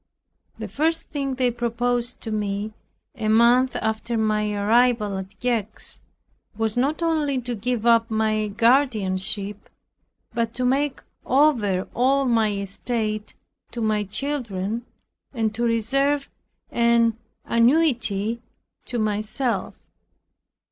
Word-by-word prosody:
The - - -5
first 325 +3 -1
thing 275 -3 -2
they 250 -1 +1
proposed 240 +1 -1
to 225 - -5
me, 210 0 -2 0.4
a 220 - -4
month 235 +4 +4
after 220 +2 -2
my 215 -1 +1
arrival 215 0 +2
at 190 +1 -10
Gex, 230 -4 -2 0.6
was 220 -1 -1
not 285 +7 0
only 300 -5 +1
to 245 0 -4
give 235 +1 -2
up 230 0 +4
my 215 -1 +1
guardianship, 210 -4 +1 0.6
but 230 -1 -1
to 255 - -1
make 275 +2 0 0.2
over 240 -10 +2
all 270 +3 +2
my 225 -4 +2
estate 215 +2 -3 0.4
to 240 - -5
my 215 -2 +1
children 225 -2 -3 0.5
and 220 -2 0
to 235 +2 -2
reserve 275 +5 +1 0.4
an 235 -1 +3 0.3
annuity 235 -4 +2 0.4
to 245 - -4
myself. 215 +3 -1
230 Hz, 115 wpm, -23 LUFS, 215-250 Hz, 0.6 s, month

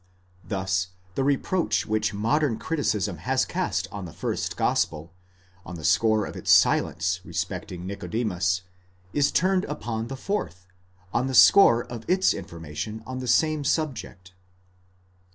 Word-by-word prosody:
Thus 95 -2 -1 0.3
the 135 - -1
reproach 145 +6 +1
which 110 0 0
modern 115 +5 +1
criticism 105 - -1
has 130 - 0
cast 95 - -2
on 100 -2 -6
the 85 - -8
first - - -3
gospel, 80 +2 0 0.5
on 90 - -8
the 80 - -9
score 110 +5 +3
of - - -8
its - - -6
silence 90 0 +3
respecting 90 -1 -5
Nicodemus, 90 -2 -1 0.5
is 145 -1 +2
turned 185 +1 +2
upon 115 -5 -4
the 135 +2 -6
fourth, 130 - -4 0.5
on 125 +2 +1
the 130 - -2
score 120 -11 +7
of 115 -2 -8
its 185 +1 +3
information 85 +7 -7
on 130 0 -5
the 130 - -5
same 155 +4 +2
subject. 120 - -3
110 Hz, 135 wpm, -25 LUFS, 90-135 Hz, 0.5 s, score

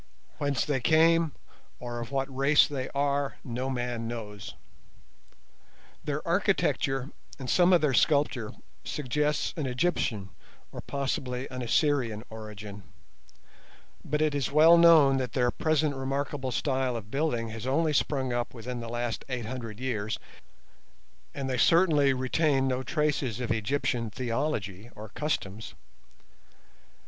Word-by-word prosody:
Whence 145 -2 0
they 145 -3 0
came 165 +3 +4 0.5
or 120 -1 -5
of 115 -1 -6
what 135 -1 -2
race 140 +3 +5
they 135 -3 -4
are 140 0 0
no 125 +2 -3
man 120 -3 -3
knows. 105 -4 -7 1.5
Their - - -3
architecture 135 +1 +1 0.3
and 135 -3 -7
some 175 +7 +4
of 175 - +5
their 150 -3 +2
sculptures 140 -6 +2 0.3
suggest 150 +2 -1
an 145 - -1
Egyptian 125 - -1 0.4
or - - -7
possibly 130 -2 -3
an 130 0 -5
Assyrian 120 -3 +1
origin; 105 -2 -8 1.2
but 150 +1 0
it 155 -1 +1
is 140 -2 -1
well 160 +3 +7
known 160 -5 +7
that 130 -2 -3
their 125 -2 +2
present 155 -2 +1
remarkable 135 0 -3
style 130 -1 0
of 110 -2 -7
building 135 -6 -1
has 115 +2 -6
only 155 +3 +2
sprung 135 -3 0
up 120 +1 -2
within 120 +1 -5
the 115 -1 -6
last 120 -1 -3
eight 125 -3 -3
hundred 115 -2 -6
years, 110 -4 -2 1.2
and 135 -2 -3
they 130 -2 -1
certainly 155 -1 +4
retain 135 +1 +1
no 130 0 0
traces 135 -4 -1
of 125 -3 -3
Egyptian 115 +1 -1
theology 115 -4 -3
or 105 0 -9
customs. 110 -7 -4
130 Hz, 135 wpm, -28 LUFS, 115-145 Hz, 1.5 s, well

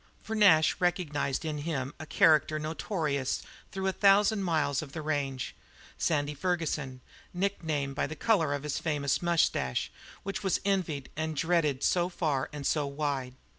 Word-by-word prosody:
For 220 - -4
Nash 180 -8 +5
recognized 165 -6 0
in 150 -2 -2
him 145 -3 -3
a 155 - -7
character 155 -1 +4
notorious 155 -3 -2 0.3
through 190 0 -4
a 190 - +2
thousand 205 +2 +4
miles 160 -6 +1
of 145 -3 -9
the 160 - -4
range, 140 -4 -2 0.4
Sandy 145 -2 0
Ferguson, 150 -5 -2 0.3
nicknamed 160 -7 -1
by 140 - -1
the 155 - -6
colour 160 -6 +2
of 145 - -6
that 150 - -3
famous 145 -2 0
moustache, 165 - +1 0.3
which 195 +1 -4
was 195 -4 +1
envied 175 -9 -1
and 160 0 -2
dreaded 155 -4 +1
so 175 0 +2
far 150 -7 -1
and 145 -2 -6
so 150 -1 +1
wide. 140 -3 -3
155 Hz, 155 wpm, -29 LUFS, 140-175 Hz, 0.4 s, Nash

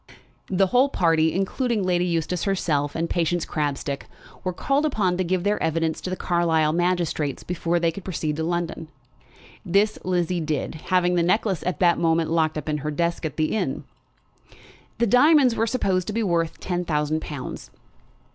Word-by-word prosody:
The 195 0 +3
whole 250 +8 +3
party, 165 - +2
including 210 - -1
Lady 180 -1 +1
Eustace 170 0 -1
herself 150 -7 0
and 165 +1 -1
Patience 175 0 0
Crabstick, 140 -2 -3 0.4
were 185 - -1
called 275 +10 0
upon 210 -12 +1
to 185 - +1
give 180 0 -1
their 205 +1 0
evidence 160 0 0
to - - -4
the 185 - -2
Carlisle 165 -4 +1
magistrates 170 -5 0
before 175 -1 -1
they 165 -1 +1
could 190 +3 -9
proceed 155 -5 -3
to 160 - -1
London. 170 -1 -2 0.8
This 200 +4 +2
Lizzie 180 -1 0
did, 155 -2 -2 0.2
having 180 -1 +3
the 175 - +2
necklace 185 0 +1
at 180 - -1
that 175 -1 +4
moment 165 -1 +1
locked 160 -2 +1
up 155 - -5
in 150 -1 -1
her 150 +2 -3
desk 170 +2 -1
at 150 - -10
the 155 +4 0
inn. 220 - -2 1.1
The 235 - +2
diamonds 255 +2 +5
were 225 - +1
supposed 190 -7 0
to 215 - -3
be 230 +1 0
worth 170 -4 0
ten 180 -1 -2
thousand 150 -1 0
pounds. 145 -5 -7
175 Hz, 175 wpm, -24 LUFS, 160-185 Hz, 1.1 s, diamonds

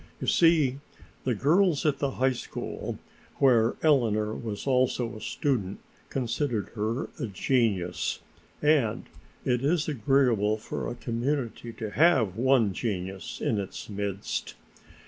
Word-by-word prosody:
You - - -4
see, 155 -6 +4 0.5
the 125 -3 +1
girls 160 - +3
at 145 -3 +2
the 140 - +1
high 130 +1 +3
school - - -5 0.4
where 120 -4 +4
Eleanor 110 -8 +3
was 110 -3 -5
also 125 -3 +1
a 110 - -9
student 105 -7 -1 0.3
considered 120 -3 -1
her 110 +3 -2
a 125 - -2
genius, 100 -5 0 0.5
and 145 -8 +2 0.4
it 125 0 +1
is 155 +2 +1
agreeable 120 -6 +2
for 105 - -5
a 120 - -5
community 120 0 -2
to 110 -2 -5
have 135 - +4
one 120 -4 +3
genius 95 -3 -4
in 110 - 0
its 100 +2 -6
midst. 100 -1 -3
120 Hz, 125 wpm, -27 LUFS, 105-135 Hz, 0.5 s, see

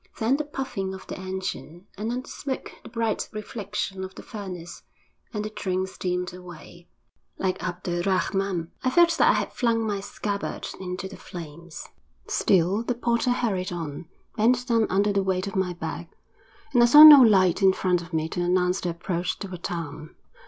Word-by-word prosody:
Then 235 +5 +2
the 300 - -2
puffing 260 -10 -4
of 190 - -11
the - - -7
engine, 185 -2 -6
and 215 +3 -3
on 250 +1 -2
the - - -17
smoke 270 -2 -5
the - - -12
bright 230 -2 -2
reflection 205 -2 -5
of 190 0 -8
the - - -10
furnace, 185 -5 -8 0.5
and 210 -3 -3
the - - -3
train 185 -3 -2
steamed 180 -1 -3
away; 175 -1 -12 0.5
like 185 -1 -1
Abd 175 +1 -5
er 175 0 -1
Rahman, 190 -2 -1
I 255 - +2
felt 340 +3 +4
that - - +6
I - - +6
had - - -2
flung 230 -2 +1
my 205 -2 -1
scabbard 200 0 -4
into 185 +1 -5
the 190 - -11
flames. 170 0 -9 0.4
Still 190 +3 +2
the 240 +1 -2
porter 235 +1 0
hurried 205 -6 -1
on, 165 -2 -6 0.3
bent 245 +2 +2
down 230 -3 +2
under 200 +2 +2
the 195 - +2
weight 190 -1 -1
of 200 - -6
my 190 -2 0
bag, 170 0 -6 0.7
and 245 - +5
I 240 - +7
saw 295 +5 +10
no 300 -3 +12
light 190 -6 +4
in 190 -1 +6
front 180 -2 0
of 170 +1 -11
me 160 -1 -1
to 175 - -3
announce 180 +1 +1
the 180 - -2
approach 175 +1 -3
to 195 -3 -7
a - - -5
town. 165 -3 -6
190 Hz, 190 wpm, -25 LUFS, 180-220 Hz, 0.7 s, no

